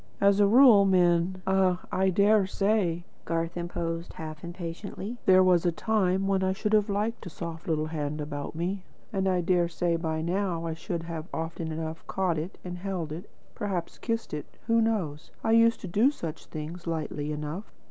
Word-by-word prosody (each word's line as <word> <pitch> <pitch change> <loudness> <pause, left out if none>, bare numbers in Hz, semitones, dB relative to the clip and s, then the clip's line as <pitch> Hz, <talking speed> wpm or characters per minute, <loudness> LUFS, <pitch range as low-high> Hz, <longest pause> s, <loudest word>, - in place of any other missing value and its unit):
As 200 0 +4
a 205 - +6
rule, 230 -2 +8
men 180 -1 +3
" - - -30
"Ah, 190 -1 +2
I 190 0 +2
dare 200 +1 +4
say," 195 -4 +1 0.2
Garth 165 0 -2
interposed 170 -1 -3
half 155 -1 -7
impatiently. 185 +6 -6
"There 185 0 +7
was 180 -2 +4
a 175 - +3
time 190 0 +1
when 195 -1 +2
I 190 0 +1
should 210 +2 -2
have 210 0 +4
liked 210 +3 -1
a - - -5
soft 165 0 -7
little 155 -2 +1
hand 150 -1 -3
about 145 0 -5
me. 180 +4 -2 0.3
And 195 -1 +1
I 185 -1 +2
dare 175 0 +2
say 170 0 0
by 160 -1 -2
now 175 -1 -1
I 165 - -2
should 165 +1 -4 0.3
often 165 0 -4
enough 160 0 -4
have - - -28
caught 180 -4 0
it 165 +5 -6
and 180 0 -5
held 180 -5 -3
it, 170 +6 -7 0.2
perhaps 185 -5 -3
kissed 230 -5 -2
it 150 - -4 0.2
who 230 0 +3
knows? 185 -10 -1
I 225 - +2
used 230 0 +5
to - - -5
do 210 +9 +4
such 165 - -6
things, 165 +3 -7
lightly 155 -2 -2
enough. 150 +7 -5
175 Hz, 190 wpm, -28 LUFS, 165-195 Hz, 0.3 s, rule